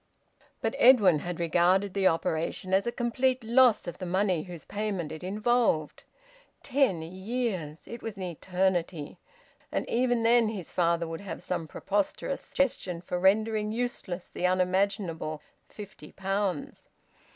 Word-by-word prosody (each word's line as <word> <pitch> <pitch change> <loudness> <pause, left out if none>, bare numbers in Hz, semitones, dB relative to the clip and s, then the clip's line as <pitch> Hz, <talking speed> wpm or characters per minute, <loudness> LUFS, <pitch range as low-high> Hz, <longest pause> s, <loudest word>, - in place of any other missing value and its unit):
But - - 0
Edwin 205 - +6
had 175 +2 -5
regarded 180 +4 +2
the 195 -1 +3
operation 165 +3 -1
as 195 +4 +3
a - - +1
complete 250 +1 0
loss 240 0 +4
of 175 - -7
the 185 - -4
money 185 -2 +1
whose 175 -1 -9
payment 200 -6 -3
it 160 +2 -8
involved. 210 -5 0 0.6
Ten 250 - +1
years! 185 -3 -4
It 235 - -8
was 220 -3 -6
an 190 - -5
eternity! 180 -2 -1 0.5
And - - -2
even 245 -1 +1
then 230 -1 +4
his 200 -6 -6
father 170 -1 +1
would 165 +2 -6
have 200 - -7
some 170 -3 -3
preposterous 205 - -2
suggestion 195 -10 -1
for 180 0 -3
rendering 210 +3 +2
useless 220 -6 -3
the 180 - 0
unimaginable 185 -3 0 0.3
fifty 200 -7 -11
pounds! 195 -4 -3
190 Hz, 140 wpm, -28 LUFS, 175-220 Hz, 0.6 s, Edwin